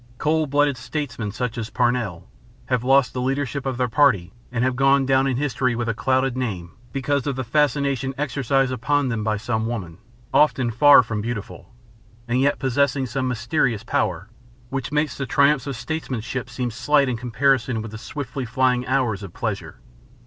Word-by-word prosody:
Cold 155 +1 +1
blooded 145 -1 +2
statesmen, 125 -7 -4
such 125 +2 -3
as 110 -1 -4
Parnell, 120 -8 -1 0.4
have 125 -2 0
lost 135 0 +4
the 125 - -2
leadership 135 +1 -2
of 130 -2 -2
their 125 0 +1
party 110 -8 +2 0.2
and 120 -1 -1
have 130 -1 +1
gone 135 +1 +4
down 135 0 +3
in 130 -2 0
history 130 -3 0
with 120 0 -2
a 115 - +1
clouded 130 +2 +1
name 95 -9 -3 0.2
because 140 +2 -1
of 140 - -1
the 130 - -3
fascination 140 0 +1
exercised 135 -1 0
upon 140 +2 0
them 115 -3 -2
by 105 0 0
some 110 +1 -2
woman, 95 -8 -5 0.3
often 130 -5 +3
far 140 +3 +7
from 105 -2 -3
beautiful, 110 -2 -6 0.6
and 125 +2 +1
yet 140 +1 +2
possessing 135 +1 +1
the 130 +2 -3
mysterious 125 -2 0
power 90 -4 -1 0.4
which 135 0 -4
makes 150 +1 0
the 135 - -2
triumphs 140 +3 +3
of 140 - -3
statesmanship 130 -4 -4
seem 125 -2 -3
slight 140 +4 +2
in 125 - -1
comparison 125 +1 +1
with 110 -1 -6
the 110 - -8
swiftly 135 +1 -5
flying 125 +1 +1
hours 125 -6 0
of 100 -4 -9
pleasure. - - -4
130 Hz, 180 wpm, -23 LUFS, 115-140 Hz, 0.6 s, far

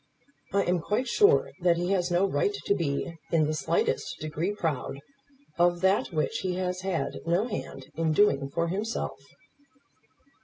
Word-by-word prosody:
I 200 0 +2
am 180 -1 +1
quite 210 +9 -1
sure 415 - +4
that 175 -1 +3
he 175 +2 -1
has 180 -2 +1
no 175 +2 +3
right 405 - 0
to - - +3
be 165 -1 -2
in 160 -3 +4
the 155 - -1
slightest 445 - 0
degree 155 +5 -2
proud 160 -9 -2 0.6
of 175 0 +3
that 190 +2 +3
which 155 -2 -1
he 185 -1 -2
has 180 0 -2
had 185 -3 -2
no 175 +6 +2
hand 135 - -6
in 160 0 0
doing 140 -6 +3
for 170 +4 -1
himself." 210 +6 -3
175 Hz, 160 wpm, -28 LUFS, 160-200 Hz, 0.6 s, sure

